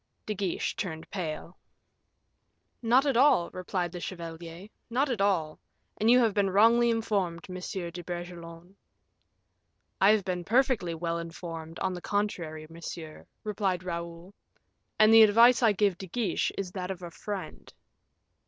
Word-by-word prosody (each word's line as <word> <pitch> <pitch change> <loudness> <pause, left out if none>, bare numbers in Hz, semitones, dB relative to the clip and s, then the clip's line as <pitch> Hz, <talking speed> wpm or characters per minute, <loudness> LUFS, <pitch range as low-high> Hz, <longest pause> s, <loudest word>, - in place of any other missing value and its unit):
De 215 - -2
Guiche 190 -3 -2
turned 160 -6 -5
pale. 170 -2 -5 1.3
"Not 250 +4 +4
at 275 -3 +1
all," 250 -8 +4
replied 180 -1 -3
the 175 - -6
chevalier, 170 +1 -7 0.2
"not 265 +4 +1
at 225 -5 -1
all; 170 -6 +1 0.4
and 220 - +1
you 245 - +7
have 230 -4 +3
been 200 -1 +2
wrongly 230 +5 +5
informed, 200 -7 -1
M. 185 -1 -6 0.3
de 175 +1 -7
Bragelonne." 175 0 -8 1.3
"I 195 - +7
have 215 -3 +3
been 180 -2 -2
perfectly 225 -5 +1
well 170 0 -2
informed, 165 -1 -7
on 190 -1 0
the 175 - -6
contrary, 170 -7 -2
monsieur," 165 -1 -9 0.2
replied 195 -4 -1
Raoul, 170 +1 -6 0.6
"and 215 +1 +6
the 225 - +9
advice 230 +4 +6
I 230 -3 +5
give 200 -2 +1
De 190 - -7
Guiche 210 -1 -1
is 195 -2 -3
that 185 -1 -5
of 185 -2 -6
a 170 - -7
friend." 200 +2 -7
185 Hz, 150 wpm, -28 LUFS, 170-215 Hz, 1.3 s, the